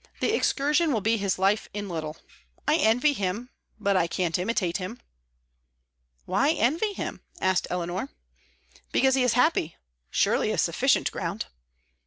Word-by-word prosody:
The 440 - +1
excursion 300 -2 +2
will 225 -5 +1
be 225 +3 +2
his 200 -2 0
life 195 +3 +1
in 205 -1 -3
little. 160 -3 -4 0.5
I 300 +1 +4
envy 250 +4 +3
him, 210 +3 -3 0.3
but 200 -1 +1
I 170 -2 +3
can't 170 -1 -1
imitate 180 -3 0
him." 195 +6 -6 1.3
"Why 275 - +2
envy 325 - +1
him?" - - -5 0.2
asked 185 -1 +1
Eleanor. 180 +7 -3 0.8
"Because 265 0 +3
he 265 - +3
is 250 -2 +3
happy; 250 - +2 0.3
surely - - +2
a - - -1
sufficient - - +2
ground." - - -3
215 Hz, 145 wpm, -26 LUFS, 185-265 Hz, 1.3 s, I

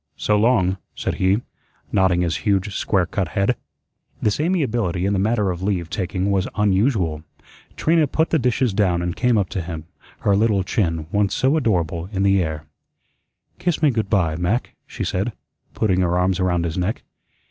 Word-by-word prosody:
"So 105 - +1
long," 105 -4 +3 0.2
said - - -3
he, 95 +4 +3 0.5
nodding 95 -2 +3
his 85 -2 0
huge 100 -2 0
square 95 -3 +1
cut 95 +1 -2
head. 100 +5 +2 0.6
This 105 +3 0
amiability 120 - 0
in 100 - +1
the 95 - +1
matter 105 -1 +1
of 90 0 -6
leave 95 -4 -1
taking 95 -1 -1
was 95 -1 +1
unusual. 100 - +1 0.5
Trina 160 -1 +2
put 160 +4 0
the 160 - +3
dishes 125 -2 +1
down 90 -4 +1
and 85 -1 -2
came 125 -2 +2
up 100 -3 +1
to 95 - -3
him, 80 -2 -6 0.4
her 100 - +3
little 105 -2 +2
chin, 80 -5 -1
once 100 -2 +1
so 135 +4 +2
adorable, 90 - 0
in 95 -2 -1
the 100 -1 +4
air: 80 -2 -3 0.9
"Kiss 170 -2 -1
me 150 - +5
good 110 -4 -2
by, 85 -7 +2
Mac," 90 +9 -1
she - - -5
said, 100 +5 -1 0.4
putting 95 -4 +1
her 90 0 +1
arms 90 +1 +1
around 90 -2 +1
his 85 +2 -2
neck. 95 +5 -2
95 Hz, 180 wpm, -21 LUFS, 90-110 Hz, 0.9 s, me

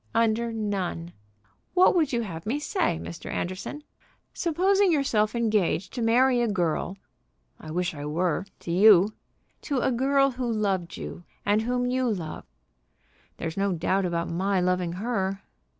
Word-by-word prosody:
"Under 230 +1 +2
none. 195 -6 -3 0.6
What 365 +1 +6
would 320 -5 +2
you 240 -2 0
have 170 -3 -7
me 250 +6 0
say, 295 - 0
Mr. 170 - -8
Anderson? 185 - -4 0.5
Supposing 375 +3 +2
yourself 235 -8 +1
engaged 210 -5 0
to 245 - -3
marry 245 +2 +4
a 240 - +2
girl 180 -1 -1 0.3
" - - -44
"I - - -10
wish 175 +2 -1
I 145 -1 -6
were 175 +4 -1
to 170 - -5
you." 200 +2 +6 0.5
"To 280 - -2
a - - +1
girl 275 +2 +3
who 250 -1 -3
loved 195 -6 -1
you, 175 - -7 0.2
and 205 +1 +3
whom 245 +2 0
you 255 0 +1
loved?" 170 -8 -4 0.9
"There's 165 +1 -5
no 195 -1 +1
doubt 185 +3 0
about 170 -1 -2
my 190 +3 0
loving 180 -1 0
her." 195 -1 -2
205 Hz, 155 wpm, -26 LUFS, 175-245 Hz, 0.9 s, What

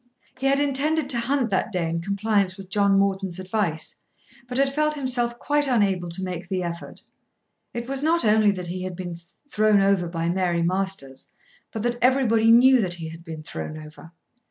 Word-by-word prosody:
He 270 - 0
had 275 +1 +3
intended 290 +1 0
to 240 - 0
hunt 250 -1 0
that 195 +3 0
day 180 -4 -1
in 165 +1 -2
compliance 200 0 0
with 195 -1 -11
John 200 -1 +3
Morton's 195 -2 0
advice, 185 -4 -2 0.5
but 250 0 -3
had 275 0 +2
felt 305 +1 +1
himself 245 -4 0
quite 290 +2 +1
unable 195 -8 +1
to 180 +3 -5
make 180 -1 -5
the 185 -1 -1
effort. 170 0 -6 0.7
It 235 0 -5
was 270 0 -2
not 330 0 +2
only 215 0 +4
that 185 -3 -2
he 180 +2 -5
had 185 -1 -5
been 175 -1 -6 0.3
thrown 215 -5 +3
over 195 -3 +2
by 165 -1 -3
Mary 175 -1 0
Masters, 185 -7 -2 0.4
but 220 - -4
that 240 0 -1
everybody 235 -3 +3
knew 250 +2 +7
that 180 -3 -2
he 165 -2 -7
had 165 +1 -11
been 160 -2 -8
thrown 155 0 -6
over. 155 +1 -12
200 Hz, 190 wpm, -24 LUFS, 175-245 Hz, 0.7 s, knew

